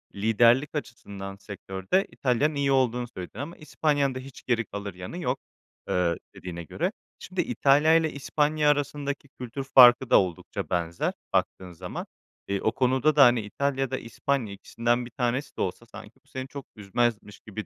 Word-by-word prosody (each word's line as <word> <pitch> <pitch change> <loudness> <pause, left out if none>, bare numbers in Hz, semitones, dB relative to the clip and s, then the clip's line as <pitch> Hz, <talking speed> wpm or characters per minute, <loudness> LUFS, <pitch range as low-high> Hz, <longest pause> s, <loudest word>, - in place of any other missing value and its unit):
Liderlik 115 +8 +3
açısından 100 -8 -6
sektörde 100 - -2
İtalya'nın 140 +4 +1
iyi 140 -1 +1
olduğunu 125 -2 +2
söyledin 95 0 -9
ama 155 +5 -6
İspanya'nın 145 -3 0
da - - -3
hiç 130 0 -11
geri 115 -3 0
kalır 100 0 -6
yanı 90 - -8
yok, 135 -7 -1 0.5
ııı, 85 -2 +1 0.2
dediğine 85 -2 -7
göre. 80 - -2 0.3
Şimdi - - -2
İtalya'yla 155 +3 +4
İspanya 150 +2 +1
arasındaki 145 -1 -1
kültür 125 +1 -6
farkı 125 -1 +7
da - - +7
oldukça 90 -4 -3
benzer, 85 -1 -1 0.2
baktığın 90 -1 -1
zaman. 90 +1 -6 0.4
Eee, 100 0 -1
o 110 - +2
konuda 130 +4 +2
da 135 -5 +8
İtalya 135 +6 -2
ya 135 -2 -1
da 130 - 0
İspanya, 115 -1 -2
ikisinden 120 +4 -1
bir 120 - -11
tanesi 125 +2 -2
de - - -2
olsa, 95 +5 -3
sanki 110 -1 -12
bu - - -32
seni 130 0 -6
çok 140 -1 -8
üzmezmiş 105 0 -1
gibi 110 0 -7
125 Hz, 165 wpm, -27 LUFS, 100-140 Hz, 0.5 s, da